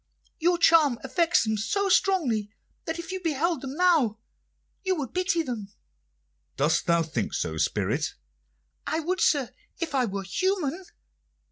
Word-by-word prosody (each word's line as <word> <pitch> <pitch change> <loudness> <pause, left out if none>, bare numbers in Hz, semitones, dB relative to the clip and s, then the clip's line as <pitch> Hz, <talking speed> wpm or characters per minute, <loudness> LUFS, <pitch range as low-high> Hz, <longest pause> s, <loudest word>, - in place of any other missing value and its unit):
Your 345 +2 +3
charm 320 -7 +5
affects 335 +6 +2
them 220 -1 -1
so 400 - 0
strongly 300 - +2 0.4
that 325 +1 -3
if 340 0 -6
you 375 0 -4
beheld 325 -1 0
them 270 0 -6
now 315 - +3 0.7
you 375 -1 +1
would 285 -7 -5
pity 365 -2 +1
them." 235 -8 -5 0.9
"Dost - - +1
thou 170 -1 +3
think 160 - -3
so, - - -2
spirit?" - - 0 0.7
"I 320 - 0
would, 350 +3 -2
sir, 275 -5 +2 0.3
if 335 -3 -3
I 260 -2 +2
were 200 -2 -4
human." 365 - -1
320 Hz, 145 wpm, -26 LUFS, 240-355 Hz, 0.9 s, charm